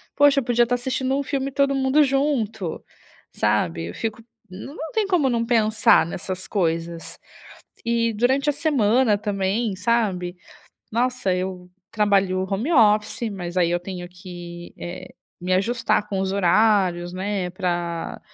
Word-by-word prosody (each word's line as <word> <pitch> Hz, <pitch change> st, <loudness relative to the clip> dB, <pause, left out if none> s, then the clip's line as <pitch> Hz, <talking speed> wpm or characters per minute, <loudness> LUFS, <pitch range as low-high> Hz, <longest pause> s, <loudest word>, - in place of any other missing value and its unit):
Poxa, 285 Hz, -1 st, +5 dB
podia 240 Hz, -1 st, +2 dB
tá 245 Hz, -, 0 dB
assistindo 260 Hz, +2 st, -1 dB
um -, -, 0 dB
filme 275 Hz, 0 st, -2 dB
todo 275 Hz, 0 st, +2 dB
mundo 270 Hz, +3 st, +3 dB
junto", 255 Hz, -, -1 dB, 0.5 s
sabe. 95 Hz, -6 st, 0 dB
Eu 85 Hz, -, -7 dB
fico 225 Hz, 0 st, -4 dB, 0.3 s
não 280 Hz, -, -7 dB
tem 440 Hz, -2 st, +1 dB
como 350 Hz, -9 st, +2 dB
não 230 Hz, -1 st, 0 dB
pensar 225 Hz, -4 st, +4 dB
nessas 185 Hz, +1 st, -5 dB
coisas. 165 Hz, -3 st, -2 dB, 0.6 s
E, 230 Hz, -1 st, +1 dB
durante 260 Hz, +6 st, +1 dB
a 295 Hz, -, +2 dB
semana 255 Hz, -7 st, +2 dB
também, 200 Hz, +1 st, -1 dB
sabe. 185 Hz, -4 st, 0 dB, 0.6 s
Nossa, 245 Hz, -5 st, 0 dB
eu 180 Hz, -1 st, -4 dB, 0.2 s
trabalho 195 Hz, -4 st, +2 dB
home 220 Hz, -, -1 dB
office, 215 Hz, -2 st, +3 dB
mas, 175 Hz, -2 st, -6 dB
aí, 170 Hz, -2 st, +3 dB
eu 175 Hz, -, 0 dB
tenho 180 Hz, -1 st, -6 dB
que, 175 Hz, -1 st, -10 dB
eh, 175 Hz, +1 st, -8 dB, 0.3 s
me 180 Hz, +1 st, -2 dB
ajustar 220 Hz, +1 st, +1 dB
com 195 Hz, -2 st, -2 dB
os 190 Hz, -, -1 dB
horários, 185 Hz, -2 st, +2 dB
né, 190 Hz, -1 st, -2 dB
pra 175 Hz, -2 st, -3 dB
210 Hz, 140 wpm, -23 LUFS, 180-245 Hz, 0.6 s, Poxa